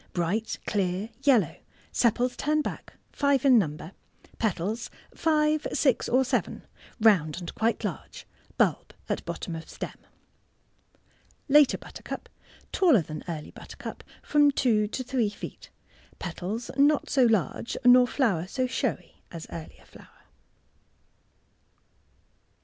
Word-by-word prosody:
— - - -39
Bright, 190 +6 -1
clear 195 +1 -1
yellow 270 -6 +3 0.3
sepals 245 +1 +1
turn 305 +1 +1
back— - - -6 0.2
five 280 -1 +1
in 255 -4 +7
number— 155 -2 -3 0.5
petals 215 +2 -1 0.2
five, 310 -1 +1
six, 265 -5 +2
or 260 +2 +3
seven— 255 0 -2 0.3
round 185 -9 +4
and 175 - -7
quite 230 +1 0
large— - - -6 0.3
bulb - - +1
at - - -2
bottom 170 -5 -5
of 160 - -8
stem. - - -7 1.5
Later 295 -1 +6
Buttercup.— - - -8 0.4
Taller 310 - +4
than 155 0 -7
early 155 -3 -5
butter - - -12
cup - - -8 0.2
(from 295 -1 +4
two 230 -6 +2
to 255 +5 -4
three 245 -4 0
feet)— 205 - -9 0.5
petals 190 +6 -5
not 290 +1 +4
so 265 - +3
large 225 0 0
nor 250 0 +7
flower 200 - 0
so 255 +5 -1
showy 250 - -3
as 165 -2 -7
earlier 70 - -9
flower. 60 - -18
230 Hz, 125 wpm, -27 LUFS, 180-270 Hz, 1.5 s, in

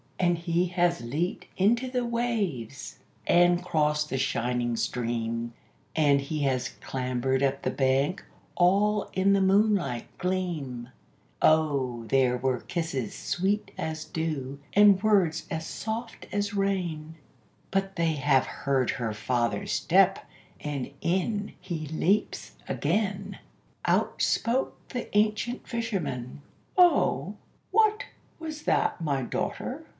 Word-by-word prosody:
And 175 -1 +3
he 170 +1 0
has 175 -1 +1
leaped 155 - -2
into 230 +7 +2
the 250 -1 -1
waves, 210 - -2 0.3
and 175 0 +4
crossed 150 -3 +1
the 135 - -1
shining 120 -2 0
stream, 115 -1 -2 0.4
And 145 -3 +4
he 150 +2 -3
has 130 -1 0
clambered 130 0 -1
up 140 0 +1
the - - +1
bank, 135 +6 +1 0.3
all 200 +4 +3
in 190 +1 +3
the 200 - +3
moonlight 190 - +2
gleam; 160 -10 -2 0.5
O 140 -7 +2
there 125 +1 +3
were 130 0 0
kisses 160 - -3
sweet 195 +4 -1
as 155 0 -4
dew, 145 -4 -3
and 205 -2 +6
words 185 -7 +2
as 160 -1 -3
soft 225 +1 -5
as 205 0 -1
rain 175 -6 -1 0.6
But 195 0 -1
they 165 -1 +1
have 140 -3 +3
heard 135 -3 0
her 115 -3 -3
father's 120 +2 -1
step, - - +3 0.3
and 140 -3 -4
in 200 +4 -1
he 160 -4 -5
leaps 185 +7 0
again! 200 -2 -1 0.5
Out - - +1
spoke 240 +4 0
the 245 -4 -5
ancient 215 +4 +1
fisherman 155 - -3 0.4
"O 355 -2 +4 0.4
what 430 +1 +3 0.3
was 310 -2 -6
that, - - +1
my 140 -4 0
daughter?" - - -3
165 Hz, 120 wpm, -27 LUFS, 135-200 Hz, 0.6 s, and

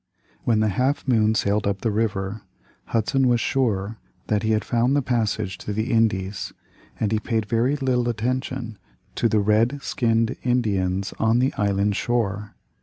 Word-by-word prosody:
When 110 -3 +3
the 110 - +2
Half 130 +9 0
Moon 110 -3 +3
sailed 100 0 +1
up 100 -1 -1
the 115 - 0
river, 105 -1 -1 0.4
Hudson 130 +4 +1
was 120 -1 +3
sure 110 -4 0 0.3
that 105 -1 +2
he 110 - -1
had 110 - 0
found 120 +3 +2
the 145 - +2
passage 110 -6 -1
to 105 - -4
the 110 +3 -2
Indies, 105 -4 0 0.5
and 110 -2 0
he 110 - +2
paid 110 -1 -1
very 115 +6 +1
little 125 -4 0
attention 120 0 -3 0.3
to 115 - +1
the 110 - +2
red 110 +7 +2
skinned 115 0 +1
Indians 100 -6 0
on 110 +1 +3
the 130 +2 +2
island 100 0 +1
shore. 105 -4 -1
110 Hz, 165 wpm, -23 LUFS, 105-120 Hz, 0.5 s, When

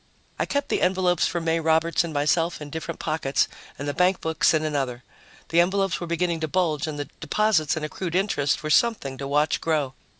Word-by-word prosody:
I - - 0
kept 285 0 -1
the - - 0
envelopes 180 -2 +2
for 175 - -2
May 165 0 0
Roberts 165 +1 +2
and 170 - -5
myself 160 +3 +1
in 150 -1 -8
different 160 +2 -5
pockets 155 -4 0 0.3
and 145 - -5
the 145 - -1
bankbooks 180 -2 +2
in 155 -2 +1
another. 135 -5 -2 0.5
The 165 - +3
envelopes 195 +1 +1
were 175 - -4
beginning 170 0 0
to 160 - -2
bulge 160 -2 0
and 155 -1 -4
the 145 - -3
deposits 215 -8 +1
and 155 -1 -3
accrued 170 +2 -4
interest 160 -8 +1
were 155 - -2
something 150 - +2
to 140 - -4
watch 150 +2 +1
grow. 150 -5 0
160 Hz, 200 wpm, -25 LUFS, 150-180 Hz, 0.5 s, The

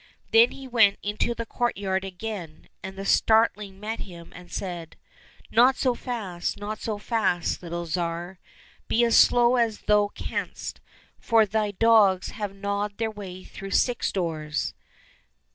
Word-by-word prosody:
Then 230 +2 +7
he 270 -1 -10
went 225 -5 +4
into 210 +3 -1
the 230 - -4
courtyard 195 -6 -1
again, 190 -4 -7
and 190 0 -7
the 195 0 -6
starling 210 -3 +2
met 220 +2 -4
him 170 -3 -10
and 175 0 -12
said, 175 -4 -5 0.3
" - - -26
Not 250 +3 +5
so 255 -2 +1
fast, 210 -10 -4
not 210 +1 -5
so 215 -2 -2
fast, 205 -6 0
little 170 0 -5
Tsar; 170 +2 -3 0.5
be 235 - +2
as 230 - +3
slow 245 +1 +6
as 230 -3 0
thou 210 -1 +3
canst, - - -5 0.4
for 225 -2 +4
thy 210 +1 0
dogs 205 -3 +4
have 205 -3 -5
gnawed 200 +1 -3
their 225 -1 -1
way 190 -3 -9
through 195 - -9
six 240 +4 +1
doors." 155 -5 -2
205 Hz, 150 wpm, -26 LUFS, 185-225 Hz, 0.5 s, Then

